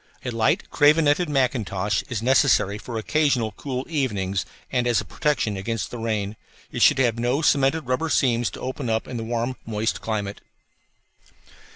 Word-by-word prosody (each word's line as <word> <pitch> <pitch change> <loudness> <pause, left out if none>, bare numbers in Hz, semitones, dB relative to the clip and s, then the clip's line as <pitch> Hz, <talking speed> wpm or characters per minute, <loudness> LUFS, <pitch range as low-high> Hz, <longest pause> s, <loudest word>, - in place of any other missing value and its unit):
A 125 - -2
light 115 -1 +1
cravenetted 150 +2 +4
mackintosh 105 -8 0
is 115 -3 -3
necessary 115 -6 +3
for 115 +1 -6
occasional 125 -2 +1
cool 130 +4 -5
evenings 100 - -1 0.2
and 125 -2 +1
as 120 -2 +3
a - - -5
protection 135 -9 -1
against 100 -1 -3
the 120 - -6
rain. 110 -2 -2 0.3
It - - -4
should - - +6
have 120 -3 +1
no 125 +6 0
cemented 140 +2 +3
rubber 130 +4 -1
seams 120 -4 +2
to - - -8
open 130 -1 -4
up 110 0 -1
in 125 - -5
the 115 - -4
warm, 120 +2 -2
moist 110 0 -2
climate. 105 -2 -3
120 Hz, 165 wpm, -24 LUFS, 110-135 Hz, 0.3 s, should